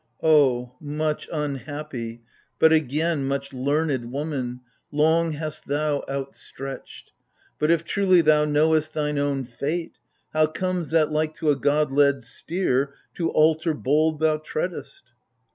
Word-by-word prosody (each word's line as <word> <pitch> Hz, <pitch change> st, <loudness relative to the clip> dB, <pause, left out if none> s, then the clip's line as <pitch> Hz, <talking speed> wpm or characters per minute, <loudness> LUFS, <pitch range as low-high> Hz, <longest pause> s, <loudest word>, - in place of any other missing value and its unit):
O 130 Hz, -6 st, +4 dB
much 150 Hz, +1 st, -2 dB
unhappy, 145 Hz, -5 st, -5 dB, 0.3 s
but, 160 Hz, 0 st, +5 dB
again, 155 Hz, 0 st, +1 dB
much 140 Hz, 0 st, -3 dB
learned 135 Hz, -2 st, -1 dB
Woman, 135 Hz, -3 st, -3 dB, 0.3 s
long 160 Hz, +2 st, +2 dB
hast 155 Hz, 0 st, -5 dB
thou 145 Hz, 0 st, 0 dB
outstretched! 135 Hz, -1 st, -7 dB, 0.5 s
But 150 Hz, -, +1 dB
if 170 Hz, -1 st, +3 dB
truly 185 Hz, -1 st, +3 dB
Thou 150 Hz, -1 st, +4 dB
knowest 155 Hz, +1 st, +2 dB
thine 150 Hz, -1 st, -1 dB
own 140 Hz, -1 st, 0 dB
fate, 145 Hz, +8 st, -4 dB, 0.3 s
how 155 Hz, 0 st, +4 dB
comes 180 Hz, +1 st, -2 dB
that, 155 Hz, -2 st, +2 dB
like 155 Hz, 0 st, 0 dB
to 155 Hz, -3 st, +1 dB
A -, -, +2 dB
god 145 Hz, +2 st, +1 dB
led 140 Hz, -2 st, +3 dB
steer, 140 Hz, 0 st, -1 dB, 0.2 s
to 165 Hz, -2 st, -1 dB
altar 155 Hz, +1 st, +3 dB
bold 155 Hz, +3 st, +1 dB
thou 155 Hz, -1 st, +3 dB
treadest 175 Hz, -, -5 dB
150 Hz, 130 wpm, -24 LUFS, 140-160 Hz, 0.5 s, but